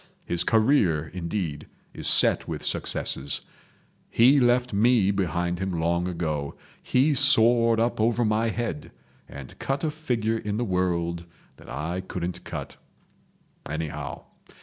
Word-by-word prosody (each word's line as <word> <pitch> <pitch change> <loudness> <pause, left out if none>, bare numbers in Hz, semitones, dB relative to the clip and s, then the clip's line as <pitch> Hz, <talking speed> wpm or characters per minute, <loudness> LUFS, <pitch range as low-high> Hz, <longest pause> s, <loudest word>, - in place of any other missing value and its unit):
His 85 - -1
career, 110 - +2
indeed, 85 -4 -4 0.3
is - - -5
set - - +4
with - - -5
successes. 70 +1 -2 0.7
He 130 +5 +5
left 125 -1 +2
me 105 -1 +3
behind 90 -2 -1
him 95 -3 -2
long 85 +2 0
ago; 80 -5 -3 0.3
he 135 +4 +2
soared 115 -4 +4
up 115 -1 0
over 115 +1 +2
my 110 +1 +1
head, 110 -11 -4 0.4
and 70 -2 -10
cut 135 +1 -2
a 155 - 0
figure 115 -8 -1
in 105 -1 -3
the 120 - -1
world 85 -3 -1 0.3
that - - -15
I 80 +8 -3
couldn't 90 -1 -5
cut—anyhow. 75 +1 -8
100 Hz, 125 wpm, -25 LUFS, 85-120 Hz, 0.7 s, He